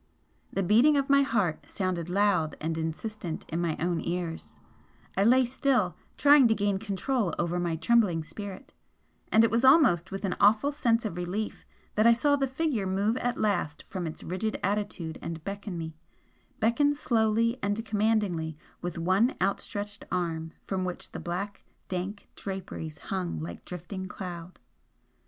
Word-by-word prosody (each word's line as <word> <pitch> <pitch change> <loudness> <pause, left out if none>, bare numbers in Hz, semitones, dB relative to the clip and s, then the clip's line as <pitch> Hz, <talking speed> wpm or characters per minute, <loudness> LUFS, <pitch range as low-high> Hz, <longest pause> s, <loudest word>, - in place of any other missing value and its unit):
The 195 - 0
beating 240 +11 +5
of 275 0 +1
my 280 0 +7
heart 210 - 0
sounded 180 -4 -2
loud 180 -5 +2
and 160 +1 -2
insistent 165 +2 -4
in 165 +2 -1
my 165 -3 -1
own 170 0 0
ears, 170 - -4 0.6
I 195 - +3
lay 255 +4 +5
still, 245 - +1 0.2
trying 285 -3 +7
to 220 - +3
gain 200 -1 0
control 205 -1 -1
over 175 +1 0
my 170 -2 0
trembling 185 -3 +3
spirit, 200 +3 -8 0.6
and 220 - +6
it 225 - +3
was 230 +2 +2
almost 260 - +6
with 195 +1 -4
an 185 - -1
awful 215 +8 +5
sense 235 -5 +1
of 180 -5 -3
relief 185 +5 -4 0.3
that 215 +2 +4
I 235 - +8
saw 285 +5 +3
the 275 -1 0
figure 260 -7 -1
move 200 +4 +1
at 245 -1 -1
last 180 -8 0
from 185 -3 -4
its 155 - -7
rigid 215 +5 -2
attitude 195 -5 -2
and 165 -1 -5
beckon 200 -1 -5
me 160 -1 -5 0.7
beckon 285 +6 +3
slowly 230 -2 +1
and 205 +3 -1
commandingly 205 -8 0 0.2
with 175 -1 -4
one 190 +9 +2
outstretched 205 +1 -2
arm 165 -3 -2
from 190 -1 -2
which 180 -1 -4
the - - -6
black, 195 +4 -4 0.3
dank 190 +3 -4
draperies 185 -5 -6
hung 180 - -3
like 85 +2 -7
drifting 185 +2 -6
cloud. 180 -2 -7
195 Hz, 160 wpm, -28 LUFS, 175-225 Hz, 0.7 s, I